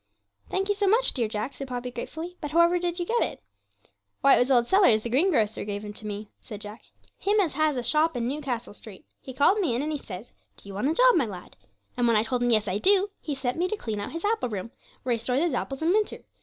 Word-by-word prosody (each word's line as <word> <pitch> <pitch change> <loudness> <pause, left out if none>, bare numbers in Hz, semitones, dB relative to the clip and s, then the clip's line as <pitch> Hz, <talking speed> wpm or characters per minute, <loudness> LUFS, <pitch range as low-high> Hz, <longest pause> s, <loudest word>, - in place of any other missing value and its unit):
'Thank 385 +1 -1
you 410 - +2
so 405 0 0
much, 460 +5 +3
dear 235 -4 0
Jack,' 215 +5 -4
said 275 - -7
Poppy 250 0 -4
gratefully. 320 +8 -6
'But 295 - -4
however 340 +3 +4
did 350 0 -2
you 350 - -2
get 475 +5 +1
it?' - - -2 0.8
'Why 275 - +7
it - - +2
was 245 - +2
old 245 -3 +4
Sellers, 300 - +4
the 235 - -4
greengrocer, 260 - +2
gave 205 0 -5
him 210 - -7
to 215 +1 -7
me,' 210 +1 -5
said 210 -4 -9
Jack, 210 +2 -10 0.3
'him 415 +2 +2
as 350 -7 +1
has 310 0 +1
a 245 - -2
shop 305 +1 +2
in 235 -1 -1
Newcastle 255 -5 -4
Street; 205 -2 -13 0.2
he 265 - -8
called 290 +11 +3
me 325 - +1
in 255 - -1
and 305 - -2
he 300 - -2
says, 200 -1 -9 0.3
"Do - - -15
you 200 - -8
want 210 +9 0
a 320 - 0
job, - - +6
my 285 -9 +2
lad?" 185 -3 -9 0.4
and 245 -1 +1
when 230 - +4
I 215 - +4
told 245 +2 -2
him 245 - +2
"Yes, 215 -2 +3
I 190 +2 -1
do," 395 - +3
he 295 - -4
set 265 +2 -3
me 360 - +2
to 430 - -3
clean 220 - -4
out 205 - -5
his 330 +4 -5
apple 435 - 0
room, 210 +1 -5 0.3
where 250 - +1
he 230 - -1
stores 250 +4 0
his 340 -1 +1
apples 270 +3 -3
in 325 - +2
winter. 420 +3 0
265 Hz, 270 wpm, -26 LUFS, 225-345 Hz, 0.8 s, Why